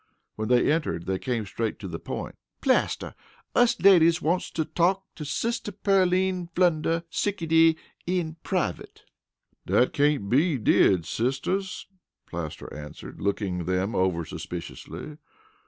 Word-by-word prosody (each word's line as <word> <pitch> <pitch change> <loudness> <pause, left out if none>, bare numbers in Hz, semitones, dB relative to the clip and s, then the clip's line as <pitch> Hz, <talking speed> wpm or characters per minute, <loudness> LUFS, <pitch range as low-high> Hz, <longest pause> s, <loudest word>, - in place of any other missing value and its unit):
When 110 0 -3
they 125 +3 +4
entered 155 - -1
they 95 0 -1
came 120 -5 -2
straight 110 +2 -3
to 100 - -7
the 80 -2 -5
point. - - -5 0.3
"Plaster, - - +1 0.4
us 245 -5 +3
ladies 170 -2 +6
wants 175 +2 0
to 160 - -2
talk 180 +5 +1
to 155 - -7
Sister 210 +10 -2
Pearline 185 -2 +1
Flunder 165 -2 +2
Sickety 165 -5 +3 0.3
in 170 -3 -1
privut." 175 - -3 0.6
"Dat 125 - +3
cain't 145 -7 +2
be 145 - +3
did, 95 -6 +4
sisters," 135 - -2 0.4
Plaster 80 -3 -6
answered, 75 0 -9
looking 100 -3 -1
them 95 +4 0
over 90 -3 +1
suspiciously. 120 - -7
155 Hz, 125 wpm, -26 LUFS, -, 0.6 s, ladies